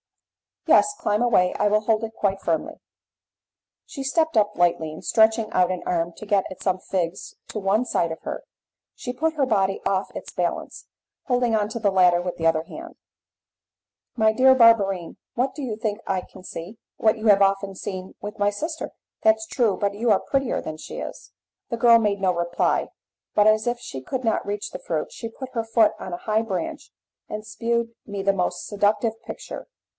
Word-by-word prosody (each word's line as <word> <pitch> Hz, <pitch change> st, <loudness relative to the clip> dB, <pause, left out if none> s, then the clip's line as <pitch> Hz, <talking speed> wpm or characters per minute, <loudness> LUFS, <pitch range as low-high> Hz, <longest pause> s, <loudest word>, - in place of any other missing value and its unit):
"Yes, 410 Hz, -, +5 dB
climb 210 Hz, +1 st, +1 dB
away; 210 Hz, -7 st, +3 dB
I -, -, +3 dB
will 210 Hz, +1 st, +3 dB
hold 220 Hz, 0 st, +1 dB
it 225 Hz, 0 st, -4 dB
quite 195 Hz, -1 st, 0 dB
firmly." 165 Hz, -2 st, -1 dB, 1.1 s
She 275 Hz, -, -7 dB
stepped 315 Hz, +1 st, +1 dB
up 210 Hz, -1 st, +3 dB
lightly, 170 Hz, -3 st, +2 dB
and 155 Hz, -, -10 dB
stretching 220 Hz, 0 st, +3 dB
out 180 Hz, -1 st, +3 dB
an 180 Hz, -1 st, -4 dB
arm 170 Hz, -1 st, 0 dB
to 215 Hz, -, -10 dB
get 200 Hz, -2 st, +2 dB
at 190 Hz, -, -9 dB
some 185 Hz, -1 st, +1 dB
figs 180 Hz, -1 st, -3 dB
to 215 Hz, -, -4 dB
one 200 Hz, +4 st, +2 dB
side 170 Hz, -8 st, 0 dB
of 160 Hz, -, -6 dB
her, -, -, -5 dB, 0.5 s
she 245 Hz, -, -5 dB
put 315 Hz, +6 st, 0 dB
her 285 Hz, -3 st, +2 dB
body 195 Hz, -5 st, +1 dB
off 195 Hz, 0 st, -1 dB
its -, -, -7 dB
balance, -, -, -3 dB, 0.4 s
holding 245 Hz, -3 st, +2 dB
on 210 Hz, -1 st, +1 dB
to 235 Hz, -, -4 dB
the 205 Hz, -3 st, +2 dB
ladder 180 Hz, -2 st, +5 dB
with 180 Hz, 0 st, -4 dB
the 165 Hz, -, -3 dB
other 160 Hz, -1 st, +2 dB
hand. 330 Hz, -, -10 dB, 1.2 s
"My 220 Hz, -2 st, +4 dB
dear 260 Hz, +3 st, +6 dB
Barberine, 200 Hz, -7 st, +4 dB, 0.2 s
what 260 Hz, +2 st, 0 dB
do 290 Hz, -, -7 dB
you 235 Hz, -5 st, -3 dB
think 215 Hz, -1 st, -2 dB
I 190 Hz, -1 st, 0 dB
can 185 Hz, -, -15 dB
see?" 185 Hz, +4 st, -8 dB, 0.2 s
"What 220 Hz, -1 st, +3 dB
you 220 Hz, +1 st, -2 dB
have 200 Hz, -1 st, +6 dB
often 195 Hz, 0 st, +2 dB
seen 185 Hz, -1 st, -6 dB
with 210 Hz, +1 st, -7 dB
my 205 Hz, 0 st, +3 dB
sister." 315 Hz, +10 st, -4 dB, 0.3 s
"That's 220 Hz, 0 st, +4 dB
true! 220 Hz, -5 st, +1 dB
but 200 Hz, -1 st, 0 dB
you 230 Hz, +3 st, 0 dB
are 200 Hz, -, +5 dB
prettier 270 Hz, -3 st, 0 dB
than 155 Hz, 0 st, -6 dB
she -, -, -8 dB
is." -, -, -8 dB, 0.4 s
The 235 Hz, -, -2 dB
girl 230 Hz, 0 st, +7 dB
made 205 Hz, -3 st, 0 dB
no 185 Hz, -2 st, +3 dB
reply, 170 Hz, 0 st, 0 dB, 0.5 s
but, 210 Hz, -, +5 dB
as 215 Hz, +1 st, +4 dB
if 240 Hz, 0 st, 0 dB
she 135 Hz, -, -7 dB
could 255 Hz, -, -4 dB
not 225 Hz, -2 st, 0 dB
reach 205 Hz, 0 st, -3 dB
the -, -, -6 dB
fruit, -, -, -3 dB
she 230 Hz, -, -6 dB
put 260 Hz, +3 st, -8 dB
her 230 Hz, -2 st, -1 dB
foot 225 Hz, -1 st, +4 dB
on 185 Hz, -, -6 dB
a -, -, -2 dB
high 215 Hz, 0 st, +2 dB
branch, 190 Hz, -7 st, -4 dB, 0.4 s
and 215 Hz, 0 st, -6 dB
shewed 230 Hz, +1 st, -1 dB
me 200 Hz, -2 st, -5 dB
the 195 Hz, 0 st, +3 dB
most 180 Hz, -2 st, -2 dB
seductive 210 Hz, +2 st, +1 dB
picture. -, -, -8 dB
210 Hz, 200 wpm, -24 LUFS, 190-230 Hz, 1.2 s, girl